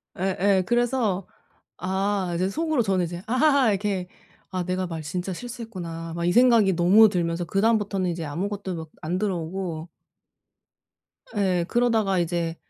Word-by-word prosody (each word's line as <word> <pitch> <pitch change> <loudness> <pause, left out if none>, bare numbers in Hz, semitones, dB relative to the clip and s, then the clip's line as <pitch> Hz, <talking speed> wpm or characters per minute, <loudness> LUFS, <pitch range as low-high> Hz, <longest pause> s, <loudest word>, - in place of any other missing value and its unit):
예예. 190 +1 +1
그래서 240 -5 0 0.5
아 190 0 -1
이제 185 +2 0
속으로 315 +1 0
저는 190 -4 +1
이제 175 +1 -6
아하하 270 -1 +4
이렇게 195 -2 -1 0.4
'아 185 -1 -2
내가 185 0 -2
말 165 -2 -5
진짜 180 +5 -4
실수했구나.' 180 -8 -7
막 170 0 -2
이 - - +3
생각이 230 -5 +5
너무 195 +6 +6
들면서 170 -2 -1
그다음부터는 200 -2 +1
이제 170 -1 -3
아무것도 190 +4 -3
막 160 -1 -7
안 175 +4 -2
들어오고 175 -3 -3 1.5
예. 180 -4 +1
그러다가 220 -6 +2
이제 170 -1 -1
190 Hz, 315 characters per minute, -25 LUFS, 175-215 Hz, 1.5 s, 너무